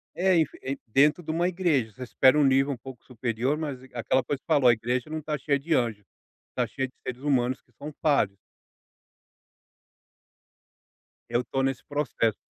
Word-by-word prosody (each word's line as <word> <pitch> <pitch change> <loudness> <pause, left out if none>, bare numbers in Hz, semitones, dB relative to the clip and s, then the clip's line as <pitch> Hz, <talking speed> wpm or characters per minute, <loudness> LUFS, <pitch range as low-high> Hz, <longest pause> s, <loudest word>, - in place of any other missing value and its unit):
É, 185 +1 +3
enfi 160 -3 +1
e 135 +1 -3
dentro 145 +9 +3
de 155 - -3
uma 170 +2 +1
igreja, 170 -11 +1
você 130 - -8
espera 130 +3 +4
um 150 - +5
nível 135 +1 +3
um - - -7
pouco 125 0 -11
superior, 125 +3 -1
mas 145 -5 -4
aquela 125 +2 +1
coisa 135 +2 -4
que - - -58
falou, 135 -3 +4
a 120 - +8
igreja 120 +4 -2
não 155 0 -4
tá 150 0 -3
cheia 140 0 +1
de 155 +4 -2
anjo, 115 -7 0 0.5
tá - - 0
cheia 135 0 -3
de - - -31
seres 130 0 -5
humanos 130 -3 +1
que 120 - -34
são 145 +6 -9
falhos. 120 -10 +2 2.9
Eu 120 - +1
estou 135 +2 -2
nesse 135 -1 -1
processo. 135 -7 0
135 Hz, 180 wpm, -27 LUFS, 125-150 Hz, 2.9 s, a